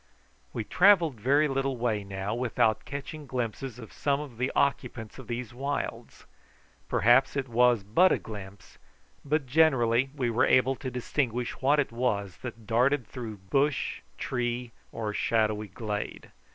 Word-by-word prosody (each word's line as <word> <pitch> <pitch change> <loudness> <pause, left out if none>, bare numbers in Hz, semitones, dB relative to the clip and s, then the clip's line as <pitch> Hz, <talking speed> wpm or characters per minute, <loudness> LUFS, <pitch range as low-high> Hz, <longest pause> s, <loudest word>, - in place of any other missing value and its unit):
We 110 - -3
travelled 175 - +4
very 140 +7 +3
little 135 -1 -1
way 115 -4 0
now 100 +1 -4
without 115 -3 +1
catching 145 +2 -7
glimpses 125 0 -4
of 115 -3 -11
some 140 -1 0
of 135 -6 -8
the 130 +1 0
occupants 125 -5 -1
of 130 - -10
these 120 -1 -4
wilds. 140 +3 -4 0.6
Perhaps 120 +5 +4
it 135 -1 -1
was 120 -2 +3
but 170 - +4
a - - +3
glimpse, 100 -2 -10 0.4
but 150 0 0
generally 130 -4 +3
we 125 -4 0
were 115 - +3
able 130 +1 +4
to 130 - -5
distinguish 125 -1 -2
what 145 +3 +4
it 140 - 0
was 105 -6 -1
that 115 -3 -8
darted 125 +4 +2
through 110 -2 -7
bush, 140 +1 +1 0.2
tree, 120 -1 -2 0.2
or 110 -2 -3
shadowy 110 -1 +1
glade. 105 +2 -5
125 Hz, 150 wpm, -28 LUFS, 110-135 Hz, 0.6 s, travelled